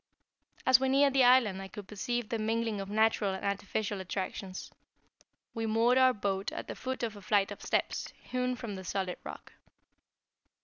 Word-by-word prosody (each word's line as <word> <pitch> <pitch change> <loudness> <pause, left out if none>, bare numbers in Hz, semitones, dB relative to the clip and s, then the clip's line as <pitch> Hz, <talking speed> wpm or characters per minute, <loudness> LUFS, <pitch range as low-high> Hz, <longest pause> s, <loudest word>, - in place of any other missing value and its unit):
As 260 -1 +7
we 265 0 +1
neared 275 +1 +4
the 270 -1 +5
island 245 -6 +5
I 195 - -6
could 205 0 -9
perceive 235 +2 -3
the 230 - -1
mingling 225 -1 -1
of 195 - -6
natural 215 -2 +2
and 190 - -6
artificial 200 0 -2
attractions. 185 0 -5 0.8
We 225 0 -2
moored 230 +4 +4
our 260 0 +6
boat 200 -2 -2
at - - -6
the - - -5
foot 260 -1 -4
of 225 -2 -2
a 205 - -10
flight 200 0 +2
of 205 - -8
steps, - - -1
hewn 250 0 -2
from 230 -4 -6
the 190 -1 -7
solid 185 0 -3
rock. - - -9
215 Hz, 180 wpm, -31 LUFS, 195-245 Hz, 0.8 s, As